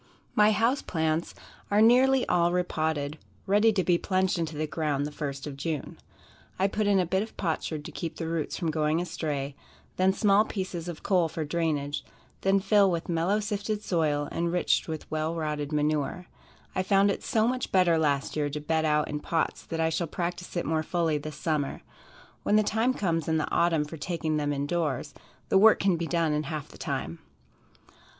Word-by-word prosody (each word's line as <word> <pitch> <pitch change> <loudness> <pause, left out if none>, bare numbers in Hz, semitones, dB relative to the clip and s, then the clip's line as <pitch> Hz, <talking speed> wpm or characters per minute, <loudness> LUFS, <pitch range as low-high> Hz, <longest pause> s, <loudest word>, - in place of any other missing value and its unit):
My 210 0 +5
house 230 +6 +2
plants 160 0 -1 0.3
are 205 - +3
nearly 255 +4 +5
all 175 0 +3
re 180 0 +2
potted, 155 -3 -2 0.3
ready 210 +3 +4
to 190 -3 +1
be 175 -1 +2
plunged 185 -2 +1
into 160 -2 -3
the 155 - 0
ground 150 -2 -1
the 150 - -5
first 140 -2 -5
of 145 -2 -6
June. 150 +1 -4 0.6
I 190 - +3
put 210 +1 -1
in 200 -1 +4
a 180 - +2
bit 190 +3 0
of 220 - -7
potsherd 160 -3 -2
to - - -7
keep 165 -2 -5
the 165 - -4
roots 165 -2 -2
from 165 -4 -1
going 155 +1 +1
astray, 145 -5 -3 0.4
then 185 +1 +4
small 200 +1 +4
pieces 185 -5 -4
of 170 -3 -7
coal 180 -4 +2
for 160 -1 -4
drainage, 150 -2 -1 0.4
then 195 +1 +3
fill 200 0 +4
with 170 -1 -2
mellow 175 +5 +1
sifted 210 0 -3
soil, 150 -6 0
enriched 170 +1 +1
with 160 -2 -5
well 155 +1 -1
rotted 150 -2 -3
manure. 150 +3 0 0.5
I - - 0
found 195 +1 +3
it - - -4
so 220 0 +2
much 255 0 -2
better 175 -3 +4
last 140 -3 0
year 150 -1 0
to 145 +1 -4
bed 160 +1 0
out 150 -1 +2
in 150 - -3
pots 160 +2 -1
that 165 - -4
I 160 0 +2
shall 165 +1 -1
practice 175 +2 -4
it 170 - -1
more 160 0 +1
fully 160 -2 0
this 150 0 -7
summer. 150 -4 -2 0.6
When 210 - +2
the 215 - +5
time 225 +5 +1
comes 165 -5 -1
in 160 0 +2
the 155 - -2
autumn 165 -3 +2
for 160 +2 -8
taking 160 -1 -2
them 145 -1 0
in 140 0 -1
doors, 150 -4 -2 0.4
the 190 - +5
work 220 +2 +7
can 195 -2 +3
be 170 0 -3
done 165 -3 +1
in 150 0 -1
half 155 -1 -5
the - - -15
time. 80 +2 -3
165 Hz, 200 wpm, -28 LUFS, 150-190 Hz, 0.6 s, work